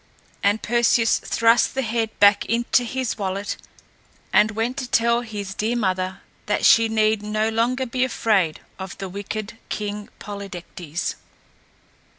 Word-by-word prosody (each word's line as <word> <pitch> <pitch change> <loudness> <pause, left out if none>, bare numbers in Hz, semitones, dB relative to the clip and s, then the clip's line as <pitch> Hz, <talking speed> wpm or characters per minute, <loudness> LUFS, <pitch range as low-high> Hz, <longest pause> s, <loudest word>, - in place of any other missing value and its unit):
And 205 +2 +1
Perseus 235 0 +3
thrust 230 +2 +3
the 265 - 0
head 225 -1 -1
back 205 0 +6
into 240 +2 +2
his 250 -1 -3
wallet 195 +1 -2 0.8
and 210 - +5
went 225 +4 -2
to 255 -3 -4
tell 235 0 +3
his 205 -4 -6
dear 220 +5 -1
mother 185 -3 -1 0.3
that 210 - +1
she 225 0 +6
need 215 -1 +2
no 215 +1 0
longer 240 +4 0
be 255 +1 -1
afraid 205 -10 +1 0.2
of 190 -1 -7
the 195 - -5
wicked 205 +3 -6
King 210 0 -4
Polydectes. 180 -5 -5
215 Hz, 140 wpm, -23 LUFS, 200-235 Hz, 0.8 s, back